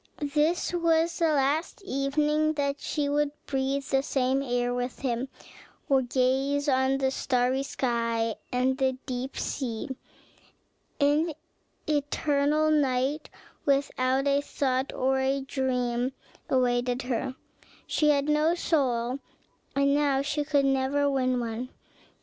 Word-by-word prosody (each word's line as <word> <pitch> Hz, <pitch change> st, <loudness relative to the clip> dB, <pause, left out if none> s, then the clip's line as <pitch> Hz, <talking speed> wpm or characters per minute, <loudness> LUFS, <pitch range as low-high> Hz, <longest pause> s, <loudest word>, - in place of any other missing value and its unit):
This 315 Hz, +4 st, +1 dB
was 335 Hz, -1 st, +2 dB
the 335 Hz, -, +3 dB
last 295 Hz, +7 st, 0 dB
evening 300 Hz, +1 st, +1 dB
that 285 Hz, -1 st, -1 dB
she 295 Hz, -2 st, -1 dB
would 290 Hz, 0 st, +1 dB, 0.2 s
breathe 275 Hz, 0 st, -1 dB
the 270 Hz, 0 st, +1 dB
same 265 Hz, -1 st, 0 dB
air 245 Hz, -2 st, 0 dB
with 245 Hz, 0 st, -3 dB
him, 255 Hz, -1 st, -1 dB, 0.6 s
or 270 Hz, -2 st, +4 dB
gaze 265 Hz, +3 st, +1 dB
on 265 Hz, 0 st, +2 dB
the 265 Hz, -1 st, +1 dB
starry 255 Hz, 0 st, +1 dB
sky 230 Hz, -4 st, -1 dB, 0.2 s
and 260 Hz, +1 st, +1 dB
the 260 Hz, -1 st, +1 dB
deep 255 Hz, 0 st, -4 dB
sea; 245 Hz, -2 st, -3 dB, 1.1 s
an 300 Hz, +3 st, +2 dB, 0.5 s
eternal 295 Hz, +1 st, +1 dB
night, 275 Hz, 0 st, +1 dB, 0.3 s
without 275 Hz, -1 st, +1 dB
a 280 Hz, 0 st, +3 dB
thought 265 Hz, -1 st, -1 dB
or 265 Hz, +1 st, +1 dB
a 270 Hz, +1 st, +1 dB
dream, 255 Hz, -2 st, -1 dB, 0.4 s
awaited 245 Hz, 0 st, +1 dB
her: 255 Hz, +1 st, -2 dB, 0.5 s
she 300 Hz, -, +2 dB
had 285 Hz, -1 st, +3 dB
no 300 Hz, +3 st, +2 dB
soul 260 Hz, -7 st, 0 dB, 0.6 s
and 280 Hz, 0 st, +3 dB
now 280 Hz, -2 st, +2 dB
she 295 Hz, +1 st, -1 dB
could 285 Hz, -2 st, +2 dB
never 270 Hz, +1 st, +2 dB
win 255 Hz, -2 st, +1 dB
one. 235 Hz, +1 st, -4 dB
270 Hz, 125 wpm, -27 LUFS, 255-290 Hz, 1.1 s, or